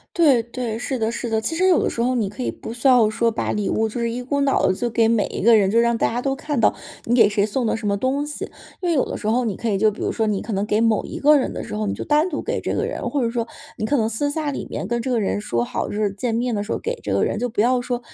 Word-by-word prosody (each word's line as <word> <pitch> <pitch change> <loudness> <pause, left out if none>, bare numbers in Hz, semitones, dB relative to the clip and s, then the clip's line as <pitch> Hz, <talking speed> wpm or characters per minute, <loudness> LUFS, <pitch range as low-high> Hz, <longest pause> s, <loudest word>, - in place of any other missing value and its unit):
对 280 -9 +4
对， 235 -2 -4
是 250 +1 -3
的 220 +1 0
是 240 - -4
的。 220 -1 0
其 325 +8 -2
实 370 +2 +2
有 360 - +4
的 - - +1
时 - - -7
候 250 +2 +2
你 220 -6 0
可 230 +5 -6
以 - - -1
不 - - -8
需 235 +3 0
要 245 -4 +6
说 230 +2 +1
把 220 - -2
礼 210 -1 -1
物 220 0 0
就 240 +3 -5
是 230 0 -1
一 245 - -4
股 280 +3 -2
脑 275 -1 +2
地 185 - +3
就 240 - -2
给 225 0 +2
每 225 -2 +2
一 - - -5
个 225 +3 +6
人， 195 -2 +2
就 230 - +4
是 - - +6
让 235 0 +2
大 - - +2
家 240 +2 -2
都 270 +1 -1
看 285 -3 -2
到 - - +4 0.3
你 240 - +2
给 225 -4 +6
谁 205 0 +1
送 240 +4 -1
的 220 - +1
什 225 -2 -4
么 200 - +1
东 265 +6 0
西。 295 - -5 0.4
因 360 - -1
为 340 - +2
有 270 - +3
的 - - -5
时 - - -9
候 245 +3 +2
你 210 -5 -2
可 235 - -4
以 195 - 0
就 220 - +4
比 210 - -6
如 - - 0
说 220 -1 0
你 205 -2 0
可 225 - -4
能 200 +2 -1
给 210 - +1
某 225 -2 +2
一 - - -7
个 300 +2 +5
人 260 - -2
的 - - -5
时 105 - -6
候， 105 -1 -2
你 100 - -1
就 - - -5
单 305 +5 +2
独 295 - -4
给 475 +2 -2
这 - - -2
个 - - 0
人， - - -3
或 280 -4 0
者 230 - 0
说 235 -1 -2 0.3
你 215 - -3
可 290 - +2
能 220 -3 +1
私 230 +6 -1
下 300 -1 -2
里 - - -5
面 - - -4
跟 235 +1 -1
这 260 - -3
个 245 -2 +1
人 205 0 -1
说 120 - -1
好， - - -3
就 - - -5
是 210 -1 0
见 225 +4 -2
面 240 0 0
的 205 - -1
时 210 - -6
候 - - 0
给 475 - -3
这 - - -4
个 - - +2
人， - - -2
就 245 - -1
不 220 - -5
要 245 +2 +3
说 245 0 -2
235 Hz, 375 characters per minute, -22 LUFS, 215-260 Hz, 0.4 s, 要